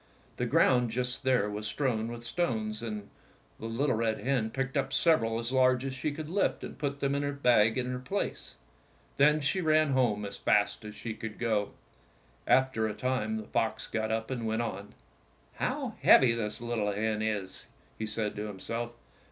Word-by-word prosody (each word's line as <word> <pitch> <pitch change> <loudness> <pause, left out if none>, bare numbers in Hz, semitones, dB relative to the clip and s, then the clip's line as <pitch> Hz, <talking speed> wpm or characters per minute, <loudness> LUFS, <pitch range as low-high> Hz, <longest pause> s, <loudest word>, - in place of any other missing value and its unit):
The - - -1
ground 125 -2 +4
just 125 +2 -2
there 130 -6 +2
was 105 +1 -4
strewn 115 -2 -1
with 120 0 -7
stones, 115 -7 -1
and 105 -3 -5 0.5
the 115 - -5
little 130 +4 0
red 110 -1 0
hen 125 -4 0
picked 135 +3 -3
up 135 -1 0
sev 165 +2 +4
eral 115 0 -1
as 115 +1 -3
large 130 0 +3
as 135 - -3
she 150 +3 -2
could 155 +1 -6
lift 190 +5 0
and - - -7
put 140 -1 -3
them 140 0 +1
in 140 - 0
the 145 0 -1
bag 120 -5 +3
in 125 - 0
her 125 - -3
place. 195 +11 -4 0.6
Then 150 +2 +5
she 185 +7 0
ran 155 -2 +3
home 115 -6 +2
as 100 - -6
fast 100 0 +2
as 105 0 -8
she 115 0 -5
could 110 -1 -7
go. 110 -4 0 0.7
After 130 -4 +3
a 105 - -4
time 115 -4 -1
the 110 - -5
fox 110 +1 -1
got 110 -1 -2
up 110 +2 -2
and 120 -3 -2
went 110 +1 0
on. 100 -2 -6 0.6
"How - - -2
heavy 125 -3 +7
this 110 -1 -3
little 115 -3 -1
hen 110 +1 -1
is!" 105 -4 -3 0.3
he 110 - -2
said 105 -1 -2
to 105 +1 -3
himself. 115 +4 -5
115 Hz, 195 wpm, -30 LUFS, 110-130 Hz, 0.7 s, heavy